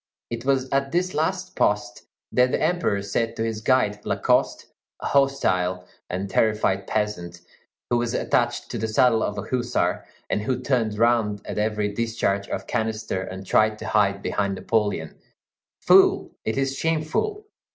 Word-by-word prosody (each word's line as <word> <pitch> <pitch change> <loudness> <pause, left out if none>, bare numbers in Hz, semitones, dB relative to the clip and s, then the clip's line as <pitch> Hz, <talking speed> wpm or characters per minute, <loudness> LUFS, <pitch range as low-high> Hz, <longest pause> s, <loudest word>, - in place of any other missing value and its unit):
It 115 +1 -5
was 135 -1 +2
at 135 0 0
this 180 +2 0
last 185 +4 -1
post 115 +4 0 0.2
that 125 0 +4
the - - +1
Emperor 155 - 0
said 115 +3 -1
to 115 - -2
his 110 -1 -3
guide, 105 -4 +1
Lacoste, - - +1 0.3
a - - -7
hostile 95 -10 +1 0.2
and 95 +2 -3
terrified 100 -2 +1
peasant, 90 -5 -2 0.5
who 120 - +4
was 120 -1 -1
attached - - 0
to - - -3
the 110 - -1
saddle 115 +1 +3
of 105 - -2
a 100 - -3
hussar, 125 +1 -1 0.2
and 105 - -1
who 125 +4 -1
turned 115 -6 0
round 110 -3 +2
at - - -4
every 105 -1 0
discharge 110 -3 -1
of - - -4
canister 110 -4 -2
and 95 0 -7
tried 110 +2 +3
to - - -6
hide 100 -2 +2
behind 100 -1 -1
Napoleon: 100 -7 -1 0.6
"Fool, - - +5
it 110 - -1
is 135 0 0
shameful! 165 - -1
110 Hz, 160 wpm, -24 LUFS, 105-130 Hz, 0.6 s, Fool